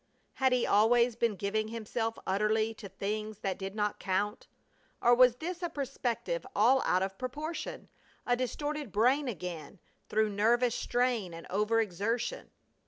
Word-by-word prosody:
Had 265 Hz, -1 st, +2 dB
he 250 Hz, -1 st, +2 dB
always 235 Hz, +3 st, +4 dB
been 230 Hz, -2 st, +1 dB
giving 205 Hz, +3 st, -1 dB
himself 225 Hz, 0 st, -3 dB
utterly 215 Hz, +3 st, +1 dB
to 210 Hz, -2 st, -10 dB
things 210 Hz, +2 st, -4 dB
that 195 Hz, -1 st, -2 dB
did 195 Hz, +1 st, -5 dB
not 210 Hz, -1 st, -1 dB
count, 200 Hz, +2 st, -1 dB, 0.5 s
or 240 Hz, 0 st, +5 dB
was 250 Hz, -1 st, +6 dB
this 345 Hz, +6 st, -5 dB
a 345 Hz, -, -1 dB
perspective 275 Hz, -, -2 dB
all 255 Hz, +5 st, +5 dB
out 185 Hz, +1 st, +3 dB
of 190 Hz, 0 st, -4 dB
proportion, 300 Hz, +6 st, -5 dB, 0.4 s
a 245 Hz, -, +3 dB
distorted 290 Hz, +1 st, -3 dB
brain 255 Hz, +8 st, +3 dB
again, 180 Hz, -5 st, -6 dB, 0.3 s
through 215 Hz, 0 st, +2 dB
nervous 235 Hz, +4 st, +3 dB
strain 240 Hz, -10 st, 0 dB
and 165 Hz, -, -9 dB
over 210 Hz, +4 st, +2 dB
exertion? 225 Hz, -, -2 dB
225 Hz, 150 wpm, -31 LUFS, 205-250 Hz, 0.5 s, was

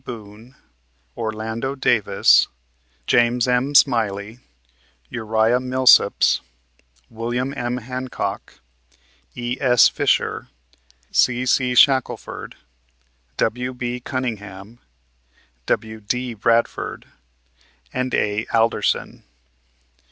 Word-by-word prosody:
Boone, 115 Hz, +1 st, -11 dB, 0.6 s
Orlando 110 Hz, +4 st, -4 dB
Davis, 120 Hz, -5 st, +3 dB, 0.6 s
James 120 Hz, -, +2 dB
M. 125 Hz, +3 st, 0 dB
Smiley, 110 Hz, -4 st, +2 dB, 0.7 s
Uriah 110 Hz, +2 st, +1 dB
Millsaps, 130 Hz, 0 st, +4 dB, 0.7 s
William 120 Hz, +4 st, -3 dB
M. 120 Hz, 0 st, -3 dB
Hancock, 125 Hz, +1 st, -5 dB, 0.7 s
E.S. 125 Hz, 0 st, +3 dB
Fisher, -, -, 0 dB, 0.6 s
C.C. 125 Hz, +1 st, +2 dB
Shackleford, 130 Hz, 0 st, +2 dB, 0.8 s
W.B. 125 Hz, +1 st, -2 dB
Cunningham, 110 Hz, -4 st, -6 dB, 0.9 s
W.D. 110 Hz, +3 st, -2 dB
Bradford 115 Hz, +2 st, -1 dB, 0.9 s
and 130 Hz, 0 st, -2 dB
A. 105 Hz, +1 st, -1 dB
Alderson. 115 Hz, 0 st, 0 dB
120 Hz, 65 wpm, -21 LUFS, 110-125 Hz, 0.9 s, Millsaps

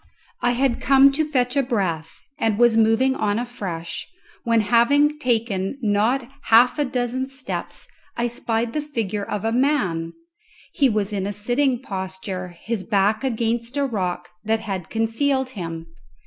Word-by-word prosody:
I 245 Hz, 0 st, +2 dB
had 255 Hz, 0 st, +1 dB
come 275 Hz, 0 st, +6 dB
to 280 Hz, +3 st, 0 dB
a -, -, +1 dB
stand -, -, -8 dB
to -, -, -16 dB
fetch 250 Hz, -1 st, +1 dB
a -, -, +5 dB
breath, 185 Hz, -, -2 dB, 0.2 s
and 220 Hz, -2 st, +1 dB
was 240 Hz, -1 st, +5 dB
moving 225 Hz, +4 st, +4 dB
on 205 Hz, -3 st, 0 dB
afresh, 195 Hz, -9 st, -5 dB, 0.4 s
when, 230 Hz, -1 st, +3 dB
having 285 Hz, +8 st, +3 dB
taken 230 Hz, -4 st, -1 dB
not 225 Hz, +5 st, +1 dB, 0.2 s
half 245 Hz, +5 st, +5 dB
a 295 Hz, -, +2 dB
dozen 255 Hz, 0 st, -2 dB
steps, 270 Hz, -1 st, -6 dB, 0.3 s
I 240 Hz, -, +1 dB
spied 230 Hz, -1 st, -2 dB
the 300 Hz, -, -1 dB
figure 220 Hz, -9 st, -3 dB
of 210 Hz, 0 st, -4 dB
a 225 Hz, -, +1 dB
man. 205 Hz, -, +1 dB, 0.6 s
He 275 Hz, -2 st, +3 dB
was 210 Hz, -2 st, -1 dB
in 195 Hz, -1 st, -1 dB
a -, -, -2 dB
sitting 245 Hz, +4 st, 0 dB
posture, 190 Hz, -3 st, -5 dB
his 190 Hz, +4 st, -5 dB
back 210 Hz, +3 st, +1 dB
against 235 Hz, 0 st, -1 dB
a 285 Hz, -, +2 dB
rock 180 Hz, -7 st, -2 dB, 0.2 s
that 220 Hz, +1 st, 0 dB
had 195 Hz, -6 st, -5 dB
concealed 260 Hz, +4 st, 0 dB
him. 165 Hz, -7 st, -6 dB
230 Hz, 165 wpm, -22 LUFS, 205-260 Hz, 0.6 s, come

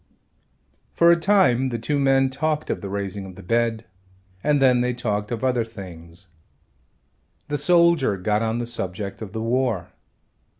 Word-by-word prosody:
For 170 Hz, 0 st, +5 dB
a -, -, +6 dB
time 170 Hz, -9 st, +3 dB
the 120 Hz, -, -3 dB
two 140 Hz, +6 st, -1 dB
men 135 Hz, -1 st, +3 dB
talked 155 Hz, +2 st, -1 dB
of -, -, -3 dB
the 100 Hz, -, -6 dB
raising 100 Hz, 0 st, -4 dB
of 95 Hz, -, -11 dB
the 95 Hz, -, -12 dB
bed 115 Hz, +2 st, 0 dB, 0.6 s
and 150 Hz, -1 st, +2 dB
then 125 Hz, -2 st, +4 dB
they 125 Hz, 0 st, 0 dB
talked 105 Hz, -4 st, -2 dB
of 115 Hz, 0 st, -4 dB
other 125 Hz, -2 st, +1 dB
things. 90 Hz, -4 st, -11 dB, 1.2 s
The 145 Hz, -1 st, -1 dB
soldier 170 Hz, -, +3 dB
got 105 Hz, +3 st, 0 dB
on 115 Hz, 0 st, -1 dB
the 120 Hz, -, -2 dB
subject 100 Hz, -3 st, -5 dB
of 105 Hz, -4 st, -7 dB
the 110 Hz, +1 st, -4 dB
war. 115 Hz, -7 st, -1 dB
115 Hz, 165 wpm, -23 LUFS, 100-135 Hz, 1.2 s, a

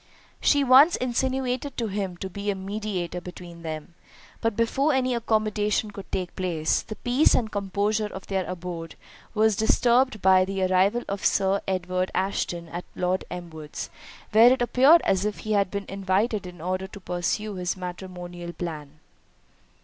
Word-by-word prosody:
She 285 Hz, -1 st, +4 dB
once 275 Hz, +6 st, +7 dB
insinuated 255 Hz, +2 st, -1 dB
to 235 Hz, -, 0 dB
him 195 Hz, -3 st, -3 dB
to 190 Hz, -, -5 dB
be 200 Hz, +2 st, -4 dB
a 200 Hz, -, +1 dB
mediator 190 Hz, -3 st, -4 dB
between 175 Hz, -1 st, -10 dB
them; 155 Hz, 0 st, -6 dB, 0.5 s
but 225 Hz, -2 st, 0 dB
before 270 Hz, +7 st, +2 dB
any 255 Hz, -1 st, +1 dB
accommodation 215 Hz, -2 st, 0 dB
could 200 Hz, -1 st, -10 dB
take 180 Hz, -2 st, -3 dB
place, 165 Hz, -4 st, 0 dB
the 215 Hz, -, -8 dB
peace 245 Hz, +7 st, +3 dB
and 220 Hz, -3 st, 0 dB
composure 205 Hz, +2 st, 0 dB
of 190 Hz, -2 st, -9 dB
their 190 Hz, -1 st, -1 dB
abode 175 Hz, -2 st, -6 dB, 0.4 s
were 220 Hz, +1 st, +5 dB
disturbed 235 Hz, +3 st, +3 dB
by 190 Hz, 0 st, +5 dB
the 190 Hz, 0 st, -2 dB
arrival 190 Hz, +5 st, +3 dB
of 200 Hz, 0 st, -4 dB
Sir 195 Hz, 0 st, +2 dB
Edward 185 Hz, -1 st, -1 dB
Ashton 180 Hz, -3 st, -1 dB
at 175 Hz, +2 st, -6 dB
Lord 180 Hz, +1 st, 0 dB
Elmwood's, 160 Hz, -4 st, -7 dB, 0.4 s
where 225 Hz, +3 st, +7 dB
it 255 Hz, -1 st, +2 dB
appeared 270 Hz, +8 st, +6 dB
as 190 Hz, 0 st, +2 dB
if 210 Hz, 0 st, -2 dB
he 215 Hz, -, -4 dB
had 200 Hz, -2 st, +2 dB
been 200 Hz, 0 st, -4 dB
invited 195 Hz, +1 st, 0 dB
in 175 Hz, -2 st, -11 dB
order 185 Hz, +2 st, -2 dB
to 200 Hz, -, -11 dB
pursue 185 Hz, +4 st, -2 dB
his 180 Hz, -1 st, -2 dB
matrimonial 180 Hz, -1 st, -7 dB
plan. 155 Hz, -5 st, -6 dB
195 Hz, 160 wpm, -26 LUFS, 180-220 Hz, 0.5 s, once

